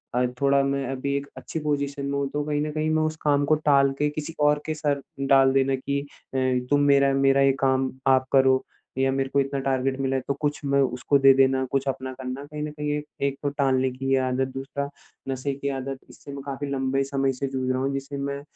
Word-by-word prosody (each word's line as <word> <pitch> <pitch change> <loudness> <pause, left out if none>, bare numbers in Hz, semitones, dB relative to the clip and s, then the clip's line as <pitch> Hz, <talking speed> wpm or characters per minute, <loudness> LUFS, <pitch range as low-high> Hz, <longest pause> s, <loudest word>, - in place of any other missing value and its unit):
अ, 125 - +3 0.2
थोड़ा 140 0 +4
मैं 140 0 -1
अभी 140 +1 -2
एक 140 - -4
अच्छी 160 - -5
पोज़ीशन 140 -2 -2
में 140 0 -1
हूँ 140 0 0
तो 150 0 -1
कहीं 150 -1 -1
न 150 0 -2
कहीं 155 +1 -1
मैं 155 0 +2
उस 155 0 -1
काम 145 -1 +2
को 155 +2 +4
टाल 140 -2 +3
के 150 0 +2
किसी 155 +2 -5
और 150 0 +3
के 155 - -1
सर 145 -2 -1 0.2
डाल 135 -1 +4
देना 135 0 +2
कि 140 +2 -2
अ, 140 -1 -10 0.3
तुम 145 - +4
मेरा 140 -1 +4
मेरा 135 0 +3
ये 135 0 +5
काम 130 -1 +1 0.2
आप 130 -1 +4
करो, 130 -1 +4 0.3
या 135 0 +2
मेरे 135 0 -1
को 140 - +1
इतना 135 0 -1
टारगेट 135 0 -1
मिला 135 0 0
हैं 130 - -1
तो 140 - +1
कुछ 150 -1 0
मैं 140 0 +3
उसको 130 +2 +1
दे 135 0 +7
देना, 135 0 +3
कुछ 135 0 0
अपना 130 0 -3
करना 130 +1 -6
कहीं 150 +1 -7
न 150 - -4
कहीं 150 0 -5
ये 150 0 -1 0.2
एक 135 0 -3
तो 145 - +1
टालने 130 -2 +1
की 135 +1 -4
ये - - +4
आदत, 130 +1 0
दूसरा 140 +1 -4 0.4
नशे 135 +1 -2
की 140 +1 -3
आदत, 135 0 -4
इससे 140 - -12
मैं 140 - -6
काफ़ी 140 0 -5
लम्बे 135 0 0
समय 135 0 0
से 135 +2 -3
जूझ 130 -1 -2
रहा 130 0 -1
हूँ 135 - 0
जिससे 135 +1 -5
मैं 140 0 -3
140 Hz, 245 wpm, -25 LUFS, 135-145 Hz, 0.4 s, दे